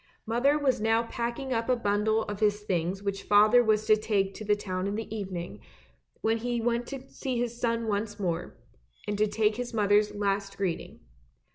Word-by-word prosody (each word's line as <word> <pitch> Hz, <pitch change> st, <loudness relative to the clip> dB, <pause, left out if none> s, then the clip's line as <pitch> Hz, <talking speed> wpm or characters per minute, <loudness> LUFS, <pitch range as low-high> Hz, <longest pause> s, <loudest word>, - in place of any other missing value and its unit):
Mother 245 Hz, +6 st, +2 dB
was 275 Hz, -6 st, +1 dB
now 225 Hz, +1 st, +3 dB
packing 240 Hz, +3 st, -3 dB
up 230 Hz, +1 st, -1 dB
a 255 Hz, -, +4 dB
bundle 215 Hz, 0 st, +1 dB
of 205 Hz, -1 st, -6 dB
his 210 Hz, -1 st, +2 dB
things 185 Hz, -1 st, -2 dB
which 200 Hz, -1 st, -2 dB
father 210 Hz, +5 st, +5 dB
was 215 Hz, -1 st, +2 dB
to 215 Hz, 0 st, +6 dB
take 200 Hz, -2 st, 0 dB
to -, -, -8 dB
the 210 Hz, 0 st, +2 dB
town 185 Hz, -2 st, -3 dB
in 200 Hz, -, -2 dB
the 220 Hz, 0 st, -5 dB
evening, 180 Hz, -, -5 dB, 0.6 s
when 225 Hz, +1 st, +1 dB
he 240 Hz, +1 st, -1 dB
went 235 Hz, +1 st, 0 dB
to 270 Hz, -1 st, -7 dB
see 260 Hz, -2 st, -3 dB
his 240 Hz, 0 st, -3 dB
son 230 Hz, -1 st, 0 dB
once 205 Hz, 0 st, -2 dB
more, 175 Hz, -3 st, -3 dB, 0.5 s
and 205 Hz, -, -1 dB
to 215 Hz, -, +4 dB
take 210 Hz, +1 st, +1 dB
his 245 Hz, -1 st, -4 dB
mother's 210 Hz, 0 st, +3 dB
last 200 Hz, -1 st, -1 dB
greeting. 185 Hz, -4 st, -3 dB
215 Hz, 190 wpm, -28 LUFS, 200-235 Hz, 0.6 s, to